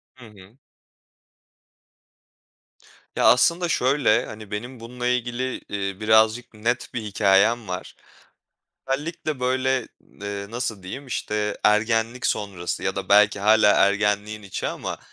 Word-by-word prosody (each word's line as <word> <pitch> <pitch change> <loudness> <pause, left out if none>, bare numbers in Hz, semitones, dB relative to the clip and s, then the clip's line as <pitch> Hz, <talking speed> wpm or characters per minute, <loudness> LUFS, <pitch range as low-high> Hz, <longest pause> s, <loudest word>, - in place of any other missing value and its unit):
Hı 125 - -14
hı. 105 +2 -17 2.6
Ya, - - +1
aslında 170 +8 +4
şöyle: 130 -5 +2
Hani 110 -1 -10
benim 120 +4 -6
bununla 120 +2 -5
ilgili, 125 +1 -2
iii, 100 -1 -4
birazcık 110 +2 +3
net 115 +3 -2
bir 120 - -3
hikâyem 105 +2 +2
var. 90 0 -6 0.9
Özellikle 145 0 -3
böyle, 130 -1 0
ııı, 100 0 -7
nasıl 115 -4 -4
diyeyim, 130 +10 -8
işte, 105 -4 -3
ergenlik 115 +3 +2
sonrası 100 -5 -3
ya - - -2
da - - -4
belki 105 0 +5
hâlâ 105 0 +5
ergenliğin 105 +1 +1
içi 100 -2 -5
ama - - -5
110 Hz, 120 wpm, -23 LUFS, 105-125 Hz, 2.6 s, belki